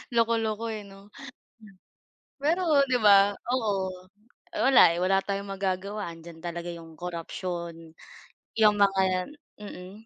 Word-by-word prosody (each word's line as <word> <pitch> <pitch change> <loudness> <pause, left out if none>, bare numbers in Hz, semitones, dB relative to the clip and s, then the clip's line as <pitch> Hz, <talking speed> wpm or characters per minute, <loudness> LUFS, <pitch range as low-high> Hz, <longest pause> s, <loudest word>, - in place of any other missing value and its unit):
Loko-loko, 230 -1 +1
eh, 210 -1 -6
'no. 195 +1 -15 1.3
Pero 315 -1 +3
'di 250 -1 +2
ba? 200 -1 +6 0.2
Oo. 190 -6 -2 0.5
Wala, 260 -10 +6
eh, 170 - -3
wala 195 +1 +2
tayong 200 0 -4
magagawa. 195 0 -3
Andiyan 165 0 -12
talaga 170 0 -5
yung 165 -1 -12
korupsiyon, 170 -1 -6 0.6
yung 210 -2 +5
mga 190 -1 +2 0.3
mm. 185 -3 -9
195 Hz, 115 wpm, -27 LUFS, 175-210 Hz, 1.3 s, ba